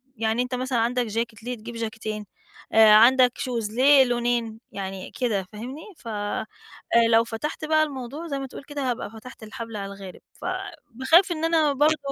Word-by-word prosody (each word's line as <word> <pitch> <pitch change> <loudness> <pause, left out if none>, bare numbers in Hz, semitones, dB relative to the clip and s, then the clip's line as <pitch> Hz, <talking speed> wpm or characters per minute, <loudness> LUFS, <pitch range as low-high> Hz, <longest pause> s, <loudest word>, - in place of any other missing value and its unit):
يعني 225 +1 0
أنت 250 0 -2
مثلًا 255 -1 -1
عندك 240 +1 0
چاكيت، 225 0 -3
ليه 250 +1 -3
تجيب 235 +2 -9
جاكيتين، 220 -2 -4 0.5
آآ 220 -1 +8
عندك 250 +3 +7
شوز، 235 -5 -3
ليه 265 +4 +6
لونين 240 -2 -1
يعني 190 -1 -6
كده 220 -7 -1
فاهمني؟ 250 +8 -7 0.2
ف - - -14 1.0
لو 225 0 +5
فتحت 235 +8 -5
بقى 310 0 +3
الموضوع 285 +2 -6
زي 280 -3 -3
ما 270 - -5
تقول 265 - -10
كده، 285 -2 -3
هابقى 230 - -4
فتحت 225 +2 -12
الحبل 230 0 -7
على 200 0 -5
الغارب، 195 -2 -11
ف - - -11 0.5
باخاف 325 - +4
إن 325 -1 -1
أنا 320 -3 +3
برضه 300 +3 +3
240 Hz, 175 wpm, -25 LUFS, 220-270 Hz, 1.0 s, آآ